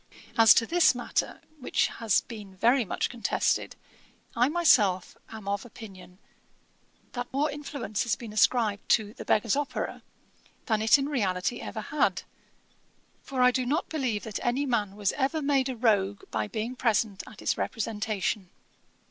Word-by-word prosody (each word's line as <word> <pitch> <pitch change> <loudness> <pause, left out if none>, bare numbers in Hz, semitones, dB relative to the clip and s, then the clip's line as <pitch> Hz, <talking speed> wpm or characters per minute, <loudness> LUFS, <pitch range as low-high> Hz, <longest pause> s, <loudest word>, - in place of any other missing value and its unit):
'As 225 -2 +8
to 230 - +3
this 340 -1 +4
matter, 245 - -2 0.2
which 250 - +1
has 225 -4 +1
been 205 -5 -10
very 240 +5 +3
much 205 - -2
contested, 240 -2 -1 0.6
I 245 +3 +3
myself 240 - +3
am 220 -3 -10
of 200 0 -1
opinion, 190 -6 -12 0.9
that 245 -1 -5
more 285 +3 0
influence 285 -8 -4
has 235 -3 +1
been 225 -3 -9
ascribed 215 -2 +2
to 215 -1 0
The - - -9
Beggar's 215 +2 +2
Opera, 290 0 -3 0.6
than 220 -2 +1
it 220 +5 +6
in 275 0 -2
reality 205 -5 -1
ever 220 - -5
had; 300 +8 0 1.0
for 260 -2 -1
I 250 - +6
do 255 +1 0
not 295 +8 -1
believe 255 -9 -2
that 215 -2 -5
any 250 +4 0
man 210 -6 -1
was 205 -2 0
ever 285 +3 -1
made 275 -2 +1
a 260 - -3
rogue 205 -4 +1
by 110 -1 -1
being 225 - -4
present 220 -5 0
at - - -13
its - - 0
representation. 215 -4 -2
230 Hz, 155 wpm, -28 LUFS, 205-260 Hz, 1.0 s, As